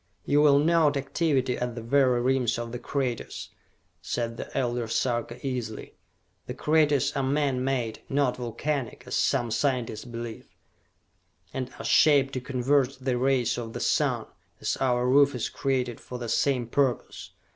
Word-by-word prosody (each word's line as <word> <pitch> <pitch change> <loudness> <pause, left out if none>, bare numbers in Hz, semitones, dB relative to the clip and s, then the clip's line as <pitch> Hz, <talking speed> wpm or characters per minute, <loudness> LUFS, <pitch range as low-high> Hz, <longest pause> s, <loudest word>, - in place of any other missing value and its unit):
"You 145 +1 +3
will 145 -2 +6
note 155 -1 +3
activity 135 -3 0
at 125 -1 -3
the 120 - -5
very 130 0 +3
rims 125 -2 +1
of 120 0 -5
the 120 - -5
craters!" 125 -2 -3 0.5
said 115 -1 -3
the - - -7
Elder 120 -2 -1
Sarka 120 0 -1
easily. 125 -5 -4 0.5
"The - - -5
craters 150 -3 +2
are 140 - +1
man 135 -1 0
made, 125 -4 -2
not 140 -2 +1
volcanic, 125 +1 -3
as 125 - -7
some 120 -4 +1
scientists 125 -3 -1
believe, 120 -2 -7 1.1
and 130 -1 -3
are - - -7
shaped 140 -3 +4
to 130 - -3
converge 135 +1 +1
the 130 -1 -1
rays 130 -2 +1
of 115 -1 -6
the - - -5
sun, - - +1 0.3
as - - -1
our 125 -1 +1
roof 140 +1 +5
is 120 - -2
created 130 -4 -1
for 125 - -7
the 120 -1 -5
same 125 +1 +1
purpose. 125 0 -1
130 Hz, 155 wpm, -27 LUFS, 120-140 Hz, 1.1 s, will